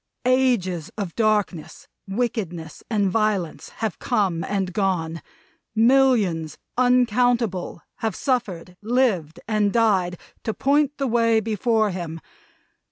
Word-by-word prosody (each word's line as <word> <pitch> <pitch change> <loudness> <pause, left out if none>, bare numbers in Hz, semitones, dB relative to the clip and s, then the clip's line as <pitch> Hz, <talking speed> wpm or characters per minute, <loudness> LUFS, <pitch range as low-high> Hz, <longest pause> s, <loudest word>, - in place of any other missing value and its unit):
Ages 240 - +1
of 195 -6 -4
darkness, 210 -7 -1 0.2
wickedness, 195 -7 -3
and 205 -4 +1
violence, 210 -6 -1
have 220 -2 -4
come 180 -6 0
and 190 -2 -2
gone 170 -5 -1 0.5
millions 225 - +3 0.2
uncountable, 245 -7 +2
have 225 -1 -2
suffered, 190 - -2
lived, 215 - 0
and 210 -2 +1
died 195 -6 +2 0.3
to 220 - -2
point 290 +1 +2
the 275 - -1
way 230 -2 +3
before 220 0 +1
him. 170 -3 -5
215 Hz, 105 wpm, -23 LUFS, 180-240 Hz, 0.5 s, millions